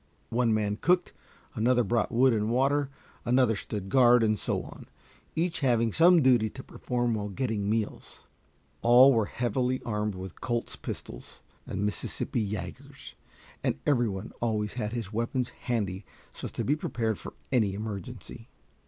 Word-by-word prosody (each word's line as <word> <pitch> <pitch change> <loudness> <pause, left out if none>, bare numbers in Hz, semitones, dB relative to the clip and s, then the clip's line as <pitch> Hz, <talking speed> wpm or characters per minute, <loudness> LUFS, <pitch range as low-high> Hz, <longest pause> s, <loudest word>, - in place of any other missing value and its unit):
One 120 0 +2
man 105 -1 0
cooked, 180 +7 +2 0.4
another 120 +3 +2
brought 115 0 0
wood 125 +2 +4
and 105 -1 0
water, 135 +3 +2 0.3
another 125 -2 +3
stood 100 -1 -5
guard, 125 -1 +6
and 110 -2 +1
so - - -1
on, - - -12 0.5
each 165 +1 0
having 115 -6 +2
some 170 -1 +6
duty 120 -4 +4
to 130 +4 -10
perform 120 -2 -2
while 105 -1 -3
getting 105 -2 -2
meals. 110 -1 -3 0.6
All 125 +3 +7
were 110 -3 +1
heavily 125 +3 -1
armed 105 -2 -2
with 95 -1 -9
Colt's 120 -2 -2
pistols - - -8 0.2
and 100 +2 -2
Mississippi 105 +2 -1
yagers, 95 -5 -7 0.5
and - - 0
every 120 -5 +3
one 95 +2 -6
always 105 -3 -1
had 110 -4 -3
his 115 -3 -5
weapons 115 +2 -1
handy 100 -5 -3 0.3
so - - -8
as - - -5
to - - -2
be 145 - +2
prepared 115 -8 -2
for - - -9 0.2
any 110 -7 +2
emergency. 110 +1 -7
115 Hz, 155 wpm, -28 LUFS, 105-125 Hz, 0.6 s, All